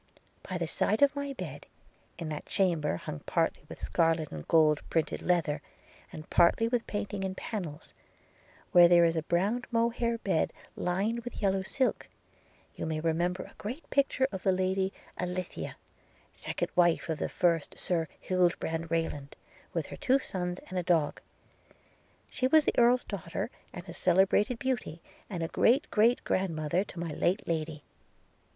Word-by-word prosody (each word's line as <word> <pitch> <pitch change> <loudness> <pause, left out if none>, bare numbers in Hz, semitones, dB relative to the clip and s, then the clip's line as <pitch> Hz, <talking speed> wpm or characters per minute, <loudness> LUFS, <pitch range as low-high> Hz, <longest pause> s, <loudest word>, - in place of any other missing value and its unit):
'By 185 - -1
the 170 - -1
side 215 - +1
of 285 0 +4
my 280 -1 -3
bed, 155 - -7 0.5
in 165 -2 -5
that 150 -1 -5
chamber 170 - +1
hung 75 -3 -6
partly - - +1
with - - -9
scarlet 165 -2 +1
and 75 -1 -7
gold 155 -2 +4
printed 160 -2 0
leather, 160 -5 +1 0.5
and 155 - -9
partly 175 +6 +4
with 235 0 -1
painting 205 -1 -3
in 190 -1 -2
pannels, 175 -8 -6 0.8
where 175 -3 +8
there 170 0 +6
is 165 0 +2
a 160 - +1
brown 195 +9 0
mohair 235 0 +1
bed 190 -8 0 0.2
lined 200 +6 0
with 245 - -7
yellow 195 -2 +1
silk, 255 +7 -1 0.7
you - - -4
may 160 -1 -1
remember 170 +3 0
a - - -14
great 250 +10 -6
picture 275 -1 +2
of 190 - -5
the 190 - +3
Lady 190 +1 +1 0.3
Alithea, 180 0 -4 0.6
second - - -4
wife 175 -2 +3
of 160 -2 -2
the - - -1
first 170 -4 +1
Sir 165 -3 -1
Hildebrand 170 -3 0
Rayland, 155 -4 -2 0.4
with - - -2
her - - -9
two 270 -2 +3
sons 180 -8 -3
and 185 - -1
a - - -2
dog 165 -4 +1 0.6
– - - -35
She 255 - +1
was 310 +2 +5
an - - +2
Earl's 245 +1 +5
daughter, 180 -4 -4 0.2
and 175 +1 -9
a 170 - -7
celebrated 190 +6 +3
beauty, 240 -10 -2 0.3
and 170 -4 -2
great 250 +4 +3
great 230 +3 +3
grandmother 170 -1 0
to 180 - -9
my 170 -2 -3
late 180 +6 0
Lady. 155 -2 -2
180 Hz, 160 wpm, -30 LUFS, 165-210 Hz, 0.8 s, where